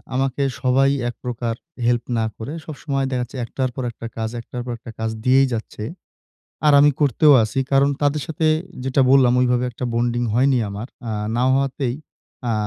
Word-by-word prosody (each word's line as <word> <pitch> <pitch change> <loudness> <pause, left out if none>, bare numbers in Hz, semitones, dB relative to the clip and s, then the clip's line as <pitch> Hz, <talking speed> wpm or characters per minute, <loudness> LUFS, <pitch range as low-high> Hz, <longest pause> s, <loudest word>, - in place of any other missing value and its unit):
আমাকে 135 +1 0 0.2
সবাই 135 +1 +3 0.2
একপ্রকার 120 -1 -4 0.3
হেল্প 120 0 +2
না 110 - +1
করে। 115 +7 -6
সবসময় 140 -2 -3
দেখা 125 - 0
যাচ্ছে 130 +2 -9
১ 115 - -7
টার 130 -1 +1
পর 130 - -3
একটা 115 +1 -8
কাজ, 110 0 -2
১ 115 - -10
টার 125 - -4
পর 125 - -4
একটা 120 - -10
কাজ 110 - -1
দিয়েই 135 +1 +5
যাচ্ছে। 110 -1 -5 0.8
আর 150 - +6
আমি 145 +1 +6
করতেও 145 +1 +5
আছি। 110 +5 -2
কারণ 140 +1 +4
তাদের 145 +1 +1
সাথে 160 0 -1 0.4
যেটা 135 +1 +2
বললাম 130 -3 +6
ওইভাবে 125 0 +2
একটা 125 +2 -5
বন্ডিং 120 +1 0
হয়নি 130 +3 +3
আমার। 105 +5 -6 0.2
আ - - -2 0.2
না 120 - +1
হওয়াতেই 135 -2 0 0.5
আ - - +2
130 Hz, 185 wpm, -21 LUFS, 120-135 Hz, 0.8 s, আর